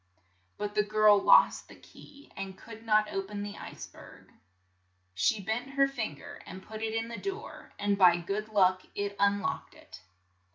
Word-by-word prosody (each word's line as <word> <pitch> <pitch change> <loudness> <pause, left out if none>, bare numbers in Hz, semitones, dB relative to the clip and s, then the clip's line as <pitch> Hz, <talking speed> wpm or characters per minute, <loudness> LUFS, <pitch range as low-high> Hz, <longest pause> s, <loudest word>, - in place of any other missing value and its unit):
But 205 0 -4
the 210 - +3
girl 210 0 +4
lost - - +5
the - - -14
key, 285 0 -17
and 195 -1 -7
could 225 0 -12
not 215 -1 +2
o 195 - 0
pen 205 +1 -6
the 205 0 -6
ice - - -8
berg. - - -16 0.8
She 95 - +1
bent 220 +7 -3
her 275 0 +4
fin 225 - -4
ger - - -11
and 190 0 -9
put 220 0 -8
it 225 0 -2
in 225 0 -1
the 230 - -7
door, 400 +4 -7
and 205 -1 0
by 175 -2 +7
good 200 +5 -4
luck 185 -3 +3
it 200 0 -3
un 200 0 +3
locked 140 -5 -4
it. - - -14
210 Hz, 190 wpm, -29 LUFS, 195-225 Hz, 0.8 s, by